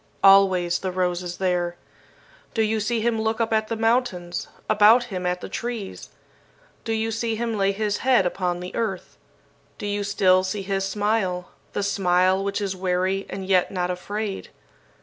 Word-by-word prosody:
Always 190 -3 +5
the 185 - -3
rose 180 -1 0
is 175 -1 -6
there. 175 -2 0 0.8
Do 225 - +3
you 220 0 0
see 225 +2 -1
him 225 -1 0
look 220 +1 -1
up 225 -1 0
at 220 0 +1
the 230 - -2
mountains, 225 -7 0 0.2
about 215 +4 +6
him 180 -1 -2
at 180 0 -1
the - - -6
trees? 230 -5 -5 0.7
Do 225 - -3
you 225 0 0
see 225 0 -1
him 230 0 -2
lay 195 -1 +2
his 210 0 -1
head 255 -7 +3
upon 180 -1 -1
the 180 - -7
earth? 205 -5 -3 0.6
Do - - -6
you 205 0 -1
still 190 -2 +3
see 195 +1 -3
his 195 0 -1
smile, 195 -3 -1 0.2
the 205 - -1
smile 185 -1 +2
which 200 +1 -2
is 195 -2 -2
weary 185 +1 -1
and 195 -1 -5
yet 185 -2 +3
not 180 -1 -1
afraid? 205 +3 -4
195 Hz, 175 wpm, -24 LUFS, 185-220 Hz, 0.8 s, about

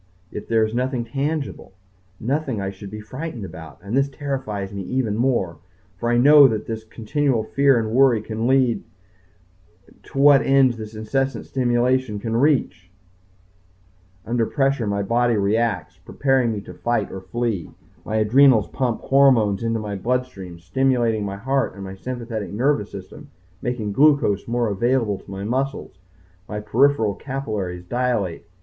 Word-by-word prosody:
Yet 105 - -7
there 110 -1 +3
is 110 - -5
nothing 125 0 -1
tangible 140 0 -3 0.5
nothing 135 -1 -2
I 95 0 -3
should 100 +1 -10
be 105 +2 -7
frightened 125 +1 -6
about, 80 -4 -10
and 100 +4 -4
this 135 +1 +2
terrifies 130 -9 -4
me 100 - -4
even 115 +1 -1
more. 115 - 0 0.4
For 120 - -1
I 120 - +3
know 145 +3 +8
where 110 -4 0
this 110 +1 -6
continual 115 +3 -1
fear 140 +3 +3
and 110 -1 -1
worry 125 -1 +4
can 110 +2 -3
lead 130 -3 +2 1.2
to - - -12
what 140 0 +7
ends 135 -2 +4
this 110 0 -8
incessant 125 +3 -2
stimulation 125 -2 +1
can 115 +2 -3
reach. 115 - +1 1.4
Under 115 -1 0
pressure 135 -5 0
my 100 0 -1
body 120 +3 +2
reacts, 105 -1 0
preparing 135 -4 +1
me 105 -2 -4
to 90 - -11
fight 115 +3 -1
or 95 - -7
flee. 115 -2 -3 0.3
My 110 - -4
adrenals 115 +1 +4
pump 125 -4 -2
hormones 125 -8 +3
into 115 0 0
my 105 -2 -4
bloodstream, 100 -5 -3
stimulating 115 +3 +1
my 100 -1 -4
heart 135 +1 -1
and 100 - -8
my 95 0 -7
sympathetic 115 0 -5
nervous 115 -1 0
system, 145 +10 -10 0.3
making 120 -4 -3
glucose 140 -6 +3
more 120 0 0
available 110 0 0
to - - -17
my 95 0 -6
muscles. 130 -3 -3 0.5
My 105 - -3
peripheral 115 0 +2
capillaries 105 -10 -4
dilate. 120 -6 -2
115 Hz, 155 wpm, -22 LUFS, 105-130 Hz, 1.4 s, know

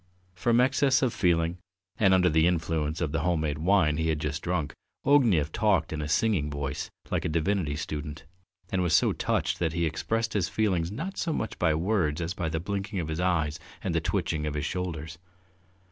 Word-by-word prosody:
From 115 +6 +2
excess 135 +1 +3
of 125 -3 +1
feeling 85 -3 +1 0.4
and 100 -3 +5
under 95 -1 +5
the 80 0 +4
influence 80 -3 -1
of 80 -4 0
the 80 - 0
home 85 +1 +1
made 75 -2 -2
wine 80 -3 +3
he 80 0 0
had 80 - +1
just 75 +1 -3
drunk, 85 -5 -2 0.3
Ognev 110 - +4
talked 95 -7 +1
in 75 - -3
a 75 - -3
singing 80 -2 +1
voice 70 -1 -4 0.2
like - - 0
a - - -1
divinity 80 -1 0
student, 75 +1 -5 0.5
and 95 - +1
was 85 -3 +3
so - - +4
touched - - -1
that 80 -2 0
he 85 0 0
expressed 115 +8 -1
his 95 -6 0
feelings 95 -6 0
not 165 - -5
so 165 - -1
much 115 -7 -3
by 80 -3 +3
words 85 -3 0
as 85 +1 -2
by 85 -3 -2
the 80 - -2
blinking 100 +2 -3
of 80 -3 -3
his 80 +1 -3
eyes 85 -4 0 0.2
and - - -1
the - - +1
twitching 75 -2 -1
of 75 - -3
his 75 0 -2
shoulders. 80 -3 -4
85 Hz, 205 wpm, -28 LUFS, 75-100 Hz, 0.5 s, and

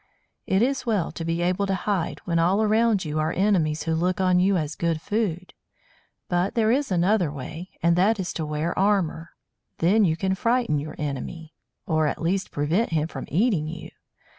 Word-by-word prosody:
It 190 +3 +3
is 270 +2 0
well 205 -7 0
to 165 - -6
be 165 +1 -1
able 185 +3 0
to 195 - +1
hide, 190 -2 -2
when 170 -1 +1
all 185 +6 +3
around 215 -2 +2
you 155 0 -2
are 155 +1 0
enemies 175 -6 +1
who 165 - -1
look 180 +3 0
on 185 -1 +3
you 190 +1 +3
as 155 -2 -2
good 165 -1 -1
food. 185 -2 -2 0.7
But 175 +2 0
there 225 -1 +3
is 275 -1 0
another 180 -2 +2
way, 155 +6 -7
and 170 0 +4
that 200 +4 +3
is 180 -2 -3
to 160 - -3
wear 150 +2 -2
armour. 190 -5 0 0.4
Then 200 +6 +3
you 160 -4 +2
can 190 +2 0
frighten 230 - +1
your 155 +2 -6
enemy, 150 +3 -5 0.3
or 155 -1 +1
at - - -2
least 185 +4 -1
prevent 160 +10 0
him 160 -1 0
from 135 -5 -7
eating 180 - +1
you. 170 +2 -8
175 Hz, 190 wpm, -24 LUFS, 160-200 Hz, 0.7 s, and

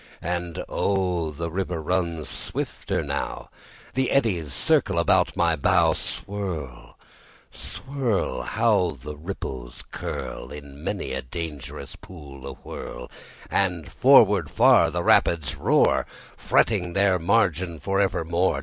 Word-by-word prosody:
And 85 0 -3
oh, 90 -4 0
the 85 +2 -5
river 90 -1 -2
runs 85 -2 -1
swifter 70 - -3
now; - - -4 0.4
The 130 0 +1
eddies 95 - +1
circle 65 - +1
about - - +3
my 85 -1 +3
bow. 70 - +3
Swirl, 85 -11 -5 0.5
swirl! 130 -6 -2
How 105 -9 +1
the 75 +4 -7
ripples 70 -7 -7
curl - - -5
In 70 0 -10
many 65 - -3
a 65 - -2
dangerous 75 +1 -7
pool 70 -6 -11
awhirl! 60 -2 -8 0.4
And 90 -5 0
forward - - +5
far - - +5
the - - -2
rapids 70 -6 +3
roar, 70 - +3 0.3
Fretting 90 -6 +1
their 100 -1 +3
margin 85 -2 +1
for 95 +5 -1
evermore. 85 -4 +1
85 Hz, 115 wpm, -25 LUFS, 75-95 Hz, 0.5 s, forward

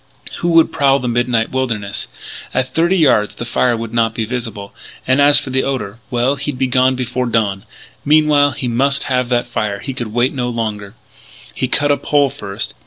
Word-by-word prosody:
Who 175 - -2
would 165 -1 +5
prowl 140 -3 +3
the 125 - -4
midnight 120 -1 0
wilderness? 115 -6 -2 0.5
At 130 0 -1
thirty 170 +4 +2
yards 130 - +3
the 120 - -6
fire 120 0 +1
would 115 0 -6
not 115 -1 +1
be 115 - -1
visible. 115 -4 -5 0.3
And, 130 +2 +3
as 145 0 +6
for 135 - -7
the 130 +1 +1
odour 115 -6 -3
well, 125 +3 +1
he'd 140 -1 -4
be 130 - +1
gone 130 +1 +2
before 125 0 -2
dawn.... 105 -3 0 0.4
Meanwhile, 150 -1 +4
he 130 - -4
must 135 +4 +1
have 125 -1 0
that 120 -1 +1
fire. 105 -4 -2
He 135 +6 -6
could 120 -4 -5
wait 120 +3 +1
no 125 -3 -2
longer. 110 -3 -4 0.6
He 130 - -2
cut 145 +3 +1
a 145 - +3
pole 145 -2 +1
first. 100 -3 -5
125 Hz, 195 wpm, -17 LUFS, 115-135 Hz, 0.6 s, as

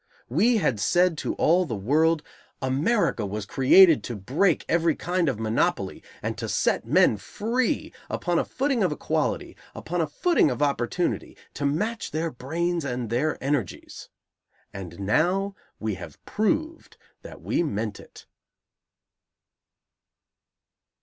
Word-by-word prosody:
We 240 +1 +3
had 135 - +1
said 175 - +3
to - - -2
all 175 +3 +3
the 130 -10 -4
world, 150 +10 +2 0.4
"America 135 - +1
was 105 +1 -4
created 140 - +6
to 120 - -4
break 145 - +1
every 165 -1 +2
kind 175 -2 0
of 130 - -2
monopoly, 110 0 0 0.2
and - - -2
to - - -4
set - - 0
men 110 - +4
free, 225 - -2 0.2
upon 175 -1 0
a - - +1
footing 270 -3 -1
of 185 - +2
equality, 150 - -2 0.2
upon 175 +1 -2
a 160 - 0
footing 340 - +2
of - - -3
opportunity, 140 +4 -1 0.2
to 145 - -1
match 215 +10 -2
their 160 +1 -2
brains 165 +6 -2
and 125 -4 -3
their 140 +6 0
energies," 135 - -3 0.6
and 95 -1 -8
now 180 - +1 0.3
we 110 -1 -2
have 95 - -10
proved 310 +10 -2 0.2
that - - -11
we - - 0
meant 110 -9 -2
it. - - -14
155 Hz, 135 wpm, -25 LUFS, 120-185 Hz, 0.6 s, created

